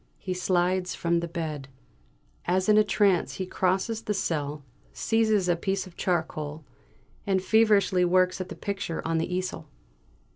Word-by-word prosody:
He 185 - -4
slides 180 0 0
from 170 0 +1
the 170 - -3
bed. 160 -5 -4 0.8
As 185 +1 +1
in 215 - +5
a 215 - +6
trance 200 -4 +2
he 185 - -3
crosses 190 +5 0
the 210 -2 -2
cell, 150 -5 -2 0.3
seizes 220 -4 +1
a 175 - +3
piece 195 +4 -2
of 185 -2 -14
charcoal, 155 -4 -2 0.6
and 190 -1 +2
feverishly 200 -2 +3
works 185 +1 +2
at 185 - -6
the - - -7
picture 195 -5 -4
on 165 0 +1
the 165 - -2
easel! 185 +1 -3
185 Hz, 155 wpm, -27 LUFS, 170-195 Hz, 0.8 s, a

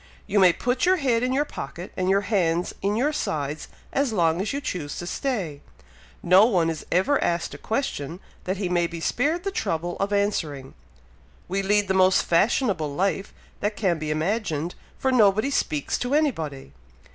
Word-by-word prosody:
You 205 0 +1
may 185 -2 +7
put 245 +7 -1
your 370 +1 +5
head 255 -9 +1
in 250 +1 0
your 280 +3 +1
pocket, 175 - -7
and 185 0 0
your 195 +1 +3
hands 180 -5 0
in 200 +1 0
your 280 +7 +1
sides 150 - -3 0.3
as 275 -3 +1
long 170 -4 +2
as 205 - -2
you 280 - -2
choose 175 - -4
to 175 - -5
stay. 180 - -3 0.6
No 185 +3 +7
one 175 -7 +2
is 160 - -6
ever 190 +12 +3
even - - -1
asked 170 0 -1
a - - -9
question, 180 - -3 0.3
that 185 +2 -1
he 195 -1 -1
may 175 -1 +1
be 170 0 -7
spared 300 - 0
the 395 - -2
trouble 175 - -2
of 195 +1 -1
answering. 165 -10 -1 0.7
We 195 +2 -1
lead 205 +1 +2
the 190 - +1
most 185 0 +4
fashionable 175 - +1
life 195 +5 -1 0.3
that 210 +1 -1
can 180 -6 0
be 155 0 -4
imagined, 165 0 -1 0.2
for 265 - 0
nobody 215 +1 +4
speaks 150 - -1
to 245 +3 0
anybody! 160 - -1
190 Hz, 185 wpm, -25 LUFS, 165-230 Hz, 0.7 s, may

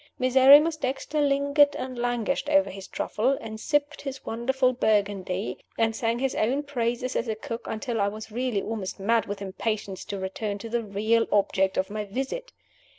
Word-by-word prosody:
Miserrimus 275 +5 +6
Dexter 275 +2 -2
lingered 285 +1 +3
and 255 0 -5
languished 245 +3 -1
over 290 -1 +3
his 195 0 -9
truffles, 260 +6 0
and 220 -1 -7
sipped 295 +3 0
his 270 -1 -7
wonderful 255 +3 +1
Burgundy, 200 -4 0 0.2
and 225 -1 +1
sang 230 0 0
his 265 +1 -1
own 260 +7 0
praises 245 -3 -2
as 235 - -1
a 220 - -1
cook 230 +2 -6
until 225 0 -2
I 200 - +3
was 215 +2 -6
really 240 -3 -1
almost 210 -4 -4
mad 225 +2 +2
with 200 0 -5
impatience 200 0 -3
to 200 -2 -4
return 200 +2 -3
to 230 +3 -8
the 235 +1 0
real 215 +3 +1
object 195 -2 +2
of 190 +2 0
my 210 0 -3
visit. 270 - -4
230 Hz, 175 wpm, -26 LUFS, 210-265 Hz, 0.2 s, Miserrimus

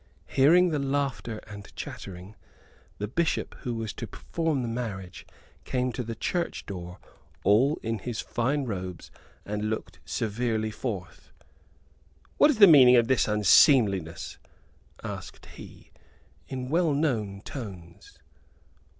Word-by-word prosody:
Hearing 170 +7 +5
the 150 -3 -1
laughter 135 -6 -2
and 100 -2 -11
chattering, 95 +2 -8 0.6
the 105 - -3
Bishop 165 +9 -1
who 120 -4 -4
was 110 -2 -4
to - - -6
perform 160 -6 -2
the - - -2
marriage 105 -6 -5 0.4
came 125 0 -1
to 120 - -4
the 115 -1 -5
church 170 - -2
door 90 -2 -7 0.5
all 120 +10 +4
in 115 -1 -2
his 115 +2 -5
fine 135 +4 -1
robes 95 -5 -6 0.3
and 105 +1 -2
looked 85 -8 -5
severely 110 - -1
forth. 100 -7 -6 1.1
"What 295 - +7
is 290 - +2
the 210 - +10
meaning 135 -8 +8
of 120 -1 +4
this 130 - +3
unseemliness?" 105 - +4 0.6
asked - - -7
he, - - -13 0.6
in 130 -1 -5
well 165 0 +2
known 110 -10 -1
tones. 95 - -9
115 Hz, 125 wpm, -27 LUFS, 100-135 Hz, 1.1 s, the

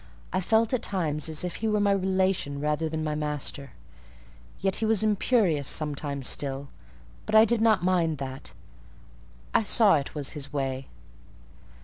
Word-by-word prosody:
I 185 - +1
felt 220 +5 +2
at 250 - +1
times 160 -7 -2
as 155 +1 -5
if 180 -1 -4
he 225 - -2
were 210 -1 +1
my 205 -1 +3
relation 190 -6 0
rather 150 +2 -1
than 160 0 -3
my 155 -1 -1
master: 150 -2 -3 0.9
yet 190 0 -1
he 225 - -1
was 220 -1 +2
imperious 205 - +2
sometimes 145 -3 -3
still; 140 0 -2 0.6
but 215 - 0
I 220 +1 +8
did 235 -1 +1
not 220 -4 +3
mind 175 -4 +1
that; 135 0 -7 1.0
I - - +4
saw 210 -4 +5
it 140 +1 -5
was 145 -2 -2
his 145 -2 -5
way. 135 -2 -3
160 Hz, 160 wpm, -27 LUFS, 145-205 Hz, 1.0 s, I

